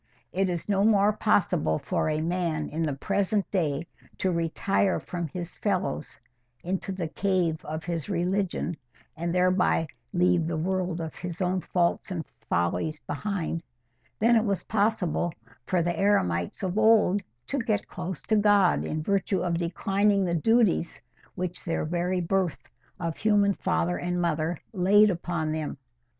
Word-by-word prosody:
It 190 0 +1
is 175 -2 -3
no 200 -1 +2
more 210 -1 +4
possible 180 - +2
for - - -1
a 155 0 0
man 165 -2 -1
in 160 +2 -3
the 155 -3 0
present 200 +7 0
day 160 -5 0 0.3
to 190 - 0
retire 175 +3 +1
from 175 -2 -4
his 175 +3 -6
fellows 190 -6 -2 0.4
into 190 +2 -2
the 185 -3 -3
cave 175 -3 0
of 155 +1 -5
his 170 -2 -3
religion, 180 -2 -1 0.4
and 170 +1 -2
thereby 180 -2 +3 0.3
leave 180 -2 +2
the 165 -1 -2
world 180 0 -1
of 160 -1 -5
his 175 -1 -6
own 185 0 0
faults 175 +2 0
and 170 -4 -3 0.2
follies 90 - 0
behind, 170 0 -3 0.5
than 235 +2 +4
it 220 - +4
was 200 -4 -1
possible 200 -5 0 0.4
for 180 -2 +2
the 175 +1 0
eremites 90 - +1
of 190 +2 0
old 215 -3 +5 0.2
to 280 - -1
get 220 -4 -1
close 180 -2 -6
to 220 - +1
God 205 -3 +4
in 155 0 -3
virtue 195 +1 +1
of 170 -2 0
declining 195 +3 +1
the 170 - -1
duties 200 -1 +2 0.4
which 180 0 -4
their 165 -2 -1
very 175 +3 0
birth 185 -1 -1 0.3
of 165 -2 -3
human 205 -2 +3
father 85 - 0
and 180 0 -2
mother 165 0 0 0.2
laid 205 +2 +5
upon 170 -3 -2
them. 155 -2 -3
180 Hz, 155 wpm, -27 LUFS, 165-200 Hz, 0.5 s, old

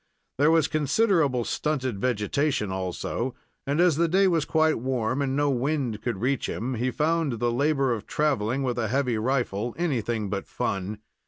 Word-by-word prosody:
There 145 +2 +5
was 160 -2 +4
considerable 155 - +2
stunted 130 -8 -2
vegetation, 120 0 0
also, 95 +7 -3 0.3
and, 140 +3 0
as 175 -4 +4
the 170 +1 +3
day 190 +4 +4
was 165 -5 +1
quite 160 -3 +2
warm, 130 +1 -1
and 135 -1 0
no 145 0 +2
wind 130 -4 -1
could 120 -5 -2
reach 130 +1 0
him, 125 +4 -3
he 125 +2 -1
found 155 +1 0
the 120 +1 0
labor 135 0 +1
of 110 -3 -6
traveling 135 -3 0
with 125 -2 -1
a 110 - 0
heavy 125 -1 0
rifle 120 -2 -1
anything 120 -10 -1
but 100 0 -4
fun. 100 +2 -3
130 Hz, 170 wpm, -26 LUFS, 115-150 Hz, 0.3 s, There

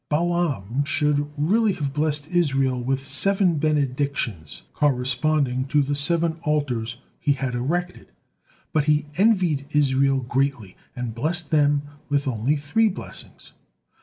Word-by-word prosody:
Balaam 150 - 0
should 145 0 +1
really 205 +8 +2
have 145 -6 -3
blessed 150 0 0
Israel 135 -7 +1
with 135 +2 -2
seven 195 -5 +2
benedictions, 140 - -1
corresponding 135 -1 +1
to 145 +1 +2
the 140 +1 -2
seven 165 +3 0
altars 125 -7 -1 0.2
he 145 -4 +2
had 135 -2 -3
erected, 175 +9 -3 0.6
but 150 -2 +2
he 150 -1 +2
envied 180 -9 +2
Israel 135 -2 +2
greatly, 125 -5 -1 0.2
and 125 -2 -4
blessed 155 +7 0
them 145 -2 +3 0.3
with 145 0 0
only 125 +4 0
three 155 +10 +2
blessings. 185 - -9
145 Hz, 125 wpm, -23 LUFS, 135-155 Hz, 0.6 s, them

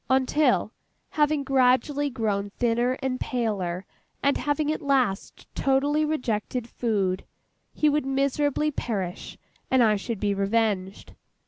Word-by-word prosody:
Until, 265 +3 +2 0.4
having 295 -1 +1
gradually 270 +2 +2
grown 210 -5 -1
thinner 240 +3 +1
and 255 -1 -1
paler, 195 -7 -2 0.4
and 280 +1 +3
having 295 +1 0
at 310 - -3
last 260 -9 0
totally 285 +3 +2
rejected 250 -5 -2
food, 200 -6 -1 0.5
he 305 - +1
would 295 -2 +1
miserably 280 +2 +1
perish, 195 -10 -4 0.3
and 260 -2 +4
I 215 -2 +4
should 220 +1 -4
be 205 0 +1
revenged. 200 -1 -1
250 Hz, 120 wpm, -26 LUFS, 210-280 Hz, 0.5 s, and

